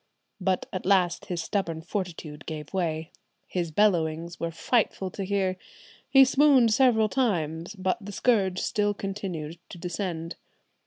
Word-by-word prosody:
"But 185 -1 0
at 185 - -3
last 180 -3 +2
his 175 -2 -3
stubborn 165 -5 -2
fortitude 170 -5 -5
gave 155 0 -6
way. 160 -4 -2 0.3
His 175 -2 -2
bellowings 170 -2 +1
were 170 - -1
frightful 190 +1 0
to 195 - -5
hear. 190 -1 0 0.5
He 270 -1 +8
swooned 265 -4 +5
several 225 -3 +4
times; 175 - -1
but 190 +3 -1
the 205 - -7
scourge 195 -4 +2
still 205 +1 0
continued 185 -6 -5
to - - -9
descend. 170 -1 -4
185 Hz, 140 wpm, -27 LUFS, 165-205 Hz, 0.5 s, He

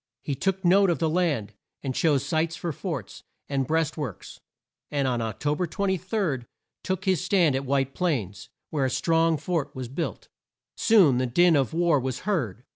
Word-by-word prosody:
He 145 - -2
took 190 +6 -1
note 195 +2 +5
of 170 - +1
the 165 - 0
land, 155 - 0 0.3
and 135 -2 -2
chose 140 -2 +2
sites 160 +3 0
for 170 - -3
forts, 140 - -6 0.3
and 135 -2 -1
breast 160 -1 0
works, 135 - -6 0.5
and 140 -2 0
on 120 -2 0
Oc 110 -3 -4
to 145 0 +1
ber 180 +3 -1
23, 190 - -1 0.4
took 190 +1 -3
his 185 -2 +2
stand 180 -7 +3
at 135 +1 -2
White 135 0 0
Plains, 110 - -2 0.2
where 145 -4 +1
a - - +1
strong 165 +4 +2
fort 155 -2 -2
was 130 -2 -5
built. 160 +6 -4 0.5
Soon 180 - +5
the 130 - 0
din 175 +7 +4
of 135 -3 +1
war 165 -2 +2
was 130 0 -3
heard. 125 - -2
155 Hz, 185 wpm, -26 LUFS, 130-175 Hz, 0.5 s, note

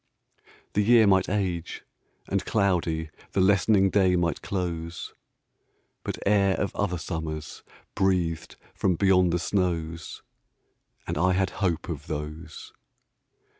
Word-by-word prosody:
The 105 - +2
year 115 +1 +6
might 95 -2 +3
age, 90 -4 -2 0.4
and - - 0
cloudy 85 -6 0 0.2
The - - +1
lessening 95 0 +4
day 95 -3 +3
might 85 -4 0
close, 85 -3 -4 0.9
But - - -4
air 100 -2 +3
of 100 - -2
other 95 -3 -1
summers 80 -2 -5 0.3
Breathed 90 -4 0 0.2
from 95 -3 +1
beyond 90 -1 +4
the 85 - +1
snows, 85 -3 -2 0.8
And - - -3
I 90 +2 +3
had 95 0 +1
hope 85 -5 0
of - - -6
those. 75 +3 -6
90 Hz, 120 wpm, -26 LUFS, 80-95 Hz, 0.9 s, year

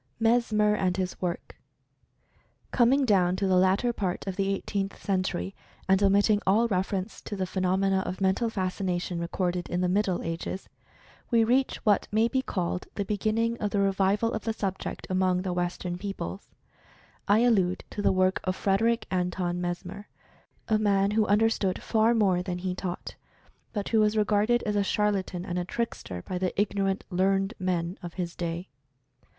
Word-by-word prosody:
MESMER 225 -2 +3
AND 185 -3 0
HIS 185 -1 -3
WORK. 175 -1 -4 1.1
Coming 265 +3 +4
down 185 -5 +3
to 195 +1 -1
the 190 -1 +3
latter 190 +6 +3
part 190 -5 -3
of 195 -2 -3
the 195 0 0
Eighteenth 195 0 -3
Century 185 - -1 0.3
and 190 +1 +4
omitting 205 +1 +4
all 220 +5 +4
reference 190 0 -2
to 205 - -6
the 190 -1 -1
phenomena 190 +1 +1
of 185 0 -4
Mental 195 +5 +1
Fascination 185 -3 -2
recorded 175 +1 -2
in 180 - -1
the 180 - +2
Middle 190 -1 +1
Ages, 165 +3 -4 0.6
we 230 -2 +4
reach 255 +4 +2
what 205 -2 +3
may 220 +2 +3
be 260 +2 0
called 180 -7 -3
the 200 - -2
beginning 220 +3 0
of 210 - 0
the 200 - 0
re 195 0 +3
vival 200 +4 +1
of 220 - -3
the 225 - -1
subject 195 -3 -4
among 185 -1 +1
the 185 -2 -2
Western 175 0 -3
peoples. 195 -1 -6 0.8
I 210 +3 +5
allude 190 -7 +2
to 205 - -4
the - - +3
work 185 0 +2
of 185 -1 -1
Frederick 225 +5 +1
Anton 180 -1 -1
Mesmer, 180 +3 -5 0.6
a 215 -2 +2
man 200 -1 +2
who 215 0 +2
understood 210 -2 +2
far 225 +1 +2
more 190 -5 +3
than 180 -1 -3
he 180 0 -2
taught, 180 -1 -5 0.6
but 205 -3 -3
who 225 - +3
was 215 0 +3
regarded 215 +3 +2
as 210 -1 -1
a 205 - +2
charlatan 195 -3 0
and 180 -2 -2
a - - -1
trickster 175 - -4
by 180 - -4
the 185 +1 -2
ignorant 195 -1 0
"learned 195 +3 +1
men" 180 -1 -1
of 175 -2 -8
his 175 -2 -4
day. 170 +1 -4
195 Hz, 170 wpm, -27 LUFS, 180-210 Hz, 1.1 s, I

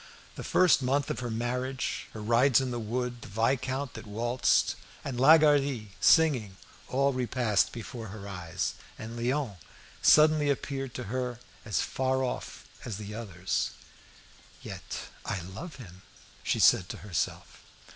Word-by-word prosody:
The - - -7
first 180 -6 +4
month 135 +2 +1
of - - -3
her 120 -1 -3
marriage, 125 +3 -2
her 110 - -7
rides 120 +4 +4
in 130 -1 -2
the 120 - -3
wood, 120 +2 -3
the - - -9
viscount 130 +5 -1
that - - -9
waltzed, 120 +4 +2 0.3
and 130 -4 -3
Lagardy 140 -6 +5
singing, 125 - +4 0.3
all 140 +1 +2
repassed 120 -4 +1
before 115 -1 -7
her 100 0 -8
eyes. 90 -2 -3 0.2
And 115 +2 -7
Léon 125 -3 -1 0.4
suddenly 155 -1 +6
appeared 135 -2 -2
to 125 - -4
her 125 +2 -3 0.3
as 110 - 0
far 130 0 0
off 125 - -4 0.2
as 110 -5 -5
the 105 0 -7
others. 95 -5 -2 0.9
"Yet - - -6 0.2
I 95 - -2
love 100 - -8
him," 95 -8 -12 0.4
she - - 0
said 90 - +5
to - - -5
herself. 100 -5 -3
125 Hz, 145 wpm, -29 LUFS, 110-135 Hz, 0.9 s, suddenly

